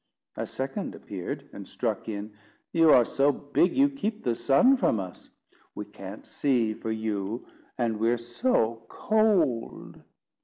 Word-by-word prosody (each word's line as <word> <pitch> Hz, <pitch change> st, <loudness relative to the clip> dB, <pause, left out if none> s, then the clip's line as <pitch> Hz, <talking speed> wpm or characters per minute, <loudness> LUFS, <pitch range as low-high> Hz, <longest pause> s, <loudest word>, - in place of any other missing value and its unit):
A -, -, -4 dB
second 135 Hz, +10 st, -4 dB
appeared, 95 Hz, -4 st, -6 dB
and -, -, -9 dB
struck -, -, -3 dB
in: 105 Hz, 0 st, -5 dB, 0.4 s
"You 165 Hz, -1 st, +5 dB
are 125 Hz, -5 st, +7 dB
so 140 Hz, +4 st, +2 dB
big, 145 Hz, -, 0 dB
you 280 Hz, +1 st, +6 dB
keep 225 Hz, -6 st, -4 dB
the 120 Hz, -, +1 dB
sun 145 Hz, -, +4 dB
from 175 Hz, -, +1 dB
us. 95 Hz, -2 st, -8 dB, 0.5 s
We -, -, -5 dB
can't -, -, -10 dB
see 120 Hz, -6 st, +1 dB
for 110 Hz, 0 st, -6 dB
you, 110 Hz, 0 st, -3 dB, 0.3 s
and 115 Hz, -3 st, -1 dB
we're 115 Hz, +2 st, +2 dB
so 115 Hz, -, 0 dB
cold." 210 Hz, -, 0 dB
120 Hz, 145 wpm, -27 LUFS, 110-175 Hz, 0.5 s, are